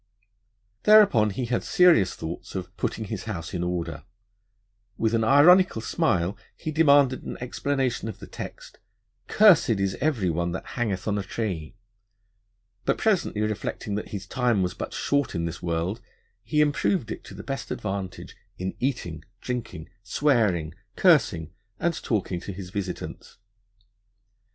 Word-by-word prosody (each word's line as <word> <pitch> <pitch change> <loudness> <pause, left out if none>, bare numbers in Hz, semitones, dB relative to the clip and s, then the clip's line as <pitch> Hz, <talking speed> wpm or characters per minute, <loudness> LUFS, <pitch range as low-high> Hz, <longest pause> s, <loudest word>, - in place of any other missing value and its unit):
Thereupon 205 - +6
he 120 +5 -3
had 120 0 -1
serious 165 - +4
thoughts 80 +4 -7
of 90 -1 -5
'putting 110 - -3
his 105 -1 -5
house 90 -6 -5
in 90 -2 -2
order'; 90 -1 -3 0.9
with 110 0 +1
an 115 -1 +2
ironical 150 +5 +6
smile 95 -4 0 0.2
he 155 - -4
demanded 140 -4 +4
an - - -7
explanation 130 -1 -1
of - - -7
the - - -10
text: - - -9 0.5
'Cursed 205 -10 +6
is 95 -1 0
every 115 - +1
one 85 +1 -1
that - - -5
hangeth 105 -6 -2
on 105 -1 +1
a - - -1
tree'; 95 -4 -4 1.1
but, - - +1
presently 190 - +1
reflecting 105 -1 -3
that 105 - -3
'his 100 -1 -6
Time 120 -3 +1
was 90 - -1
but - - -6
short 140 -6 0
in 85 0 -1
this 85 0 -5
World, 85 +3 -2 0.4
he 150 +7 +1
improved 150 - +1
it - - -6
to 95 - -10
the 100 - -8
best 135 -1 -5
advantage 95 -3 -5 0.2
in 95 +1 -3
Eating, 90 - -2 0.2
Drinking, 115 -10 -5
Swearing, 105 - +1 0.2
Cursing, 110 - +3 0.3
and 170 0 +1
talking 95 -5 -1
to 95 - -7
his 95 -1 -8
Visitants.' 95 -2 -6
105 Hz, 145 wpm, -26 LUFS, 90-135 Hz, 1.1 s, Thereupon